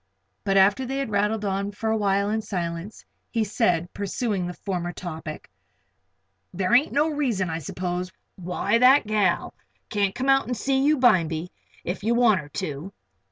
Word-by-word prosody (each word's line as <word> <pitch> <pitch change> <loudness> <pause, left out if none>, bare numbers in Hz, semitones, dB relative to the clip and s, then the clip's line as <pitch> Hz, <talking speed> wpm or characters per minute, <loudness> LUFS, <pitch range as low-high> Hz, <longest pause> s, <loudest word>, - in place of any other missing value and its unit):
But 195 -1 +1
after 200 +6 +4
they 265 +2 -3
had 275 -5 -2
rattled 210 +1 0
on 200 +1 -1
for 220 +2 -2
a - - +2
while 200 -1 +1
in 220 0 0
silence, 175 -1 -5 0.2
he 225 -2 0
said, 180 -5 0
pursuing 200 -1 -2
the 180 - -5
former 175 -3 -3
topic: 160 -3 -7 1.0
"There 185 +4 -1
ain't 285 +6 +5
no 295 +3 +2
reason, 235 - -1
I 160 - -3
s'pose, 180 +3 -4 0.2
why 190 +5 0
that 255 +1 +6
gal 210 -4 +1 0.4
can't 200 -1 0
come 255 +2 -2
out 270 -2 +4
an' 245 - -1
see 265 +3 +1
you 300 +2 +4
bimeby, 175 -9 +2 0.3
if 180 +2 -4
you 230 +2 +2
want 230 -6 +4
her 145 -1 -9
to." 155 +2 -5
200 Hz, 170 wpm, -25 LUFS, 180-235 Hz, 1.0 s, that